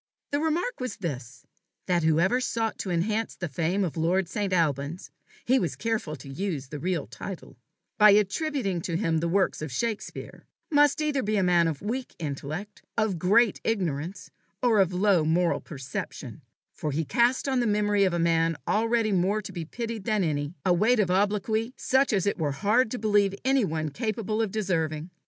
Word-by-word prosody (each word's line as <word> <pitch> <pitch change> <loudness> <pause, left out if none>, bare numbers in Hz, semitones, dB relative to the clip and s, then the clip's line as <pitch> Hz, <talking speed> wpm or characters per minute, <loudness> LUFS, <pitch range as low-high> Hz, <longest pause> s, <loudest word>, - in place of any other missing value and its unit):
The 285 - +1
remark 325 +10 -1
was 255 -1 -3
this 130 - -6 0.4
that 175 -2 +2
whoever 170 +10 +3
sought 225 -3 -2
to 190 - -4
enhance 210 +6 -1
the 175 - -4
fame 170 +7 0
of 175 - -3
lord 170 +3 +1
St. 200 +2 -2
Alban's 155 -1 -1 0.3
he 260 +2 +4
was 175 - -2
careful 220 -9 -2
to 135 0 -12
use 145 -2 -4
the 150 - -6
real 175 -1 -1
title 195 -3 -8 0.4
by 210 0 +9
attributing 205 - +1
to 170 -4 -2
him 165 -4 +1
the 170 - -1
works 190 0 +1
of 155 -3 -4
Shakespeare, 220 - -4 0.2
must 290 0 +4
either 295 -3 0
be 215 -1 0
a 195 - +2
man 175 -2 +4
of 155 -1 -4
weak 245 +5 -4
intellect, 155 +6 -5 0.2
of 215 -6 +1
great 210 +5 +3
ignorance, 180 -4 -2 0.3
or 230 -4 +4
of 190 -2 +3
low 185 -2 +3
moral 170 +3 +1
perception; 140 -3 -7 0.3
for 150 - -3
he 155 +3 -1
cast 245 - +2
on 265 -2 +1
the 240 - +1
memory 205 -1 +2
of 190 - +3
a - - 0
man 165 -1 +2
already 225 0 +2
more 195 +3 +2
to 195 - -7
be 170 -3 -5
pitied 230 +2 -5
than 215 -4 +1
any, 145 0 -2
a 180 - +4
weight 220 +7 +3
of 190 -4 +2
obloquy 210 +4 0
such 265 +1 +2
as 195 -3 +1
it 200 - 0
were 145 -3 0
hard 215 - +2
to 250 - -3
believe 205 -3 +2
anyone 190 - +1
capable 215 - -2
of 220 - 0
deserving. 170 -5 -2
195 Hz, 185 wpm, -27 LUFS, 165-220 Hz, 0.4 s, by